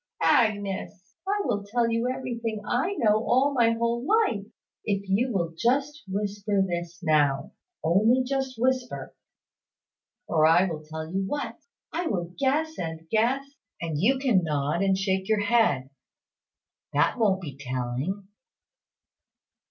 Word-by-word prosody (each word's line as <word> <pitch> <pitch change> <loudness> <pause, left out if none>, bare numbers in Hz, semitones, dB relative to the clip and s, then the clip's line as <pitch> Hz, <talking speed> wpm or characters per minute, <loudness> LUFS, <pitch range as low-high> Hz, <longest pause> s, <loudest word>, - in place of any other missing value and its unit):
Agnes, 205 -7 +1
I 410 +1 +1
will 210 -6 -1
tell 230 +3 0
you 230 +2 0
everything 235 -4 -3
I 265 - 0
know 215 - +2
all 270 +4 +3
my 235 -3 +4
whole 235 +1 -1
life, 310 - +2 0.4
if 200 -2 -1
you 225 +7 +1
will 170 -5 -1
just 275 - 0
whisper 205 +1 -1
this 175 -1 -4
now. 145 -4 +2 0.3
Only 215 +10 +4
just 265 0 -2
whisper. 255 0 -1 1.1
Or, 155 -1 +3
I 175 +4 +5
will 160 -4 -4
tell 160 +2 -7
you 195 - 0
what. 290 +10 -3 0.4
I 345 0 -1
will 175 - -2
guess 310 +4 0
and 160 -1 -5
guess; 245 +5 +2 0.3
and 160 -3 -3
you 250 - +3
can 245 -9 +2
nod 150 +2 0
or 195 -1 +3
shake 190 0 -1
your 215 -1 +3
head. 205 - +2 1.0
That 150 - +2
won't 200 -4 +3
be 150 -8 -7
telling." 135 +8 -3
205 Hz, 135 wpm, -26 LUFS, 170-250 Hz, 1.1 s, I